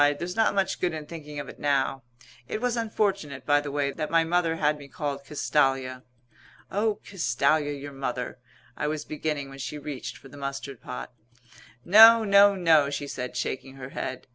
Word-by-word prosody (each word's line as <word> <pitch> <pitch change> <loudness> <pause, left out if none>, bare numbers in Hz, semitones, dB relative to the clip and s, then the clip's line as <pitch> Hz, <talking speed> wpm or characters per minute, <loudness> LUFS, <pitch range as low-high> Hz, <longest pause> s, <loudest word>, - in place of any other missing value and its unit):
"There's 175 +3 -5
not 225 -2 +2
much 195 -1 0
good 175 -3 0
in 155 -1 -6
thinking 150 -2 -8
of 145 - -6
it - - -11
now. 135 -2 +1 0.5
It - - -3
was 245 0 0
unfortunate, 200 - -1
by 145 0 +4
the 145 -1 -5
way, 140 -1 0
that 155 +1 -4
my 165 0 +4
mother 165 0 +1
had 150 -1 +1
me 140 - -11
called 140 -3 -4
Castalia." 135 -3 0 0.7
"Oh, 210 +1 0
Castalia, 145 -3 +1
your 145 +1 -7
mother 125 -2 -4 0.2
" 125 -2 -30
I 150 - -2
was 150 0 -3
beginning 150 -2 -3
when 135 0 -11
she 150 - -5
reached 140 -5 -6
for - - -15
the 145 - -13
mustard 140 -2 -6
pot. - - -7 0.7
"No, 225 +4 +9
no, 200 -1 +6
no," 160 -6 +4
she 145 0 -4
said, 125 -2 -5
shaking 135 +1 -4
her 130 -1 -8
head. 130 -1 -5
145 Hz, 190 wpm, -26 LUFS, 135-170 Hz, 0.7 s, No